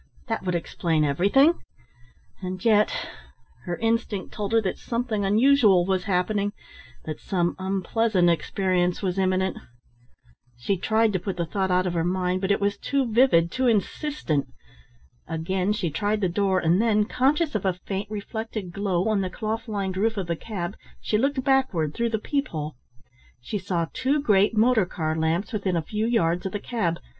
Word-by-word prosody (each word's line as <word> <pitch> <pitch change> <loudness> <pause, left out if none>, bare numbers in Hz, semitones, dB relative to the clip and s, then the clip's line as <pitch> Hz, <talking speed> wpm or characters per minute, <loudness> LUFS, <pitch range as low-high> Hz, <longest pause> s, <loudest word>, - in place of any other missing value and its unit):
That - - -1
would 180 -1 -1
explain 165 -1 0
everything. 200 - +3 0.8
And 185 +1 -5
yet 215 -2 +4 0.7
her 175 -1 -2
instinct 225 -3 -1
told 205 -1 -3
her 225 0 +4
that 190 - -2
something 230 -3 -2
unusual 210 -3 +4
was 190 -1 0
happening, 200 +1 0 0.5
that 155 - -5
some 175 -3 -1
unpleasant 195 0 +1
experience 180 +2 0
was 185 0 -1
imminent. 190 0 +1 1.0
She 120 +11 0
tried 220 +3 +1
to 185 - +1
put 185 0 -4
the 170 - -1
thought 190 +3 -1
out 180 0 +2
of 180 - -1
her 165 -1 0
mind, 180 +1 0
but 190 - -1
it 200 - +3
was 200 0 -1
too 270 -5 -1
vivid, 190 -9 +4
too 255 0 0
insistent. 225 - 0 0.8
Again 180 +4 -1
she 185 -6 -1
tried 205 +7 -1
the 190 - +2
door, 190 +1 +1
and 175 +3 +3
then, 215 -2 +3
conscious 285 +7 +1
of 215 - -1
a 190 -2 +1
faint 195 +1 -3
reflected 215 -2 -5
glow 190 0 -1
on 215 -2 +2
the 185 - -2
cloth 220 +4 -4
lined 195 -3 -3
roof 220 +2 +1
of 195 - -1
the 170 0 -1
cab, 195 0 -5 0.2
she 210 - 0
looked 275 +1 0
backward 255 - +1
through 235 0 0
the 220 - 0
peep 280 +6 -1
hole. 155 -1 -5 0.7
She 205 - -4
saw 180 -3 -1
two 265 +3 +1
great 210 -4 +3
motor 220 -3 +4
car 160 -3 -2
lamps 160 +8 -1
within 195 -4 -1
a 165 - +1
few 215 +6 -2
yards 180 -6 +1
of 190 - -7
the 205 - -2
cab. 200 -8 -2
195 Hz, 175 wpm, -25 LUFS, 180-220 Hz, 1.0 s, yet